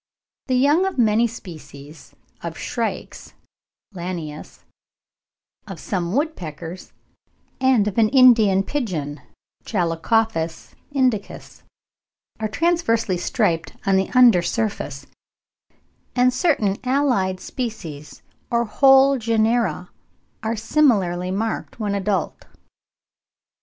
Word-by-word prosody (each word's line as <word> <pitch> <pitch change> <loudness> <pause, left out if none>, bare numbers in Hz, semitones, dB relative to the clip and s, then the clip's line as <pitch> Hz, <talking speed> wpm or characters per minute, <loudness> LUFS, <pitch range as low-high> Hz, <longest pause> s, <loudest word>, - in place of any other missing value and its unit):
The 255 - +1
young 295 +9 +3
of 385 - -5
many 230 0 +3
species 155 -8 -12 0.3
of - - -6
shrikes - - -5 0.6
(Lanius), 170 -4 -7 1.0
of 195 -5 -8
some 175 -1 -3
woodpeckers, 180 - -4 0.7
and 260 -5 +3
of 210 +2 -1
an 220 -1 +4
Indian 225 -7 +5
pigeon 160 - -4 0.4
(Chalcophaps 170 -1 -1 0.2
indicus), 255 -7 -2 0.8
are 220 - -1
transversely 230 - 0
striped 170 -1 -1
on 195 -1 +3
the 190 0 +1
under 240 -8 +6
surface; 170 - -3 1.1
and 250 0 +3
certain 245 - +1
allied 250 -9 +1
species 180 - -7 0.3
or 235 -2 +1
whole 270 +3 +5
genera 225 -4 0 0.5
are 225 +1 -2
similarly 210 - +1
marked 220 +5 -3
when 205 -2 -2
adult. 195 -3 -2
215 Hz, 95 wpm, -21 LUFS, 180-250 Hz, 1.1 s, under